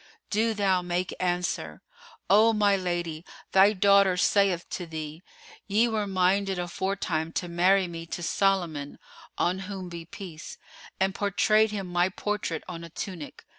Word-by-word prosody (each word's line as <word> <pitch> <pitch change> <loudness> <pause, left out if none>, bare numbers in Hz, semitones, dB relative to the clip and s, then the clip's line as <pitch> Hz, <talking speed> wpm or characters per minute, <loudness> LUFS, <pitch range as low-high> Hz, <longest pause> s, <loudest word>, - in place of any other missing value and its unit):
do 220 +1 +1
thou 190 -3 +2
make 180 +1 -2
answer, 175 - -2 0.4
O 215 +4 +5
my 205 -2 +3
lady, 175 -4 -3 0.3
thy 195 +2 +6
daughter 200 -2 +4
saith 190 -2 +2
to 175 - -4
thee, 155 0 -6 0.5
"Ye 215 +4 +3
were 215 -3 -1
minded 190 +1 +1
aforetime 175 -2 -2
to 175 - -2
marry 180 +2 +3
me 165 -1 -7
to 175 - -5
Solomon 170 -6 0 0.4
(on 180 +2 +1
whom 190 -3 -6
be 170 -1 -8
peace!) 170 -2 -9 0.4
and 190 0 +1
portrayed 215 +2 +2
him 205 -2 -4
my 175 0 +1
portrait 200 -4 -3
on 170 -2 -7
a 170 - -9
tunic. 170 -2 -7
185 Hz, 145 wpm, -27 LUFS, 170-200 Hz, 0.5 s, thy